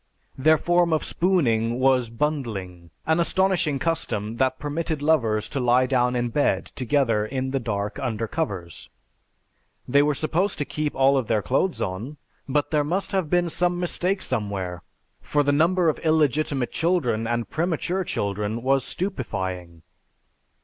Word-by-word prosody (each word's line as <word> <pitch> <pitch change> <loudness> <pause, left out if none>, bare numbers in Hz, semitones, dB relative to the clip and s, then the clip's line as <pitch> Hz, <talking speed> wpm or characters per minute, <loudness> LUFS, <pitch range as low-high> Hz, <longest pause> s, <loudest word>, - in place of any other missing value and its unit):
Their 155 +4 +4
form 175 +1 +2
of 155 - +1
spooning 120 -11 +1
was 130 -2 +3
'bundling,' 115 - -3 0.2
an 160 +2 +2
astonishing 175 -3 +1
custom 115 -7 -2
that 130 0 +1
permitted 155 +2 -3
lovers 115 -9 +2
to 140 - -3
lie 125 +1 +3
down 125 -1 +1
in 120 -1 0
bed 110 -7 +1
together 125 -4 0
in 130 +4 -3
the 135 - 0
dark, 105 -4 -3
under 115 -3 -2
covers. 95 - -4 1.0
They 140 +3 +4
were 150 0 +2
supposed 170 +7 0
to 145 - -2
keep 150 0 -3
all 135 0 +4
their 110 -3 -1
clothes 180 - 0
on, 110 +11 -5 0.3
but 145 +2 0
there 150 -2 +2
must 180 +8 -2
have 190 -6 0
been 175 0 +2
some 175 +1 0
mistake 180 +2 -1
somewhere 100 -7 -3 0.4
for 145 0 +1
the 145 - +2
number 170 +4 +3
of 155 - +1
illegitimate 150 -4 +1
children 135 -11 0
and 120 0 -2
premature 175 +3 -1
children 105 - -2
was 135 0 +2
stupefying. 95 - -4
135 Hz, 150 wpm, -24 LUFS, 115-160 Hz, 1.0 s, Their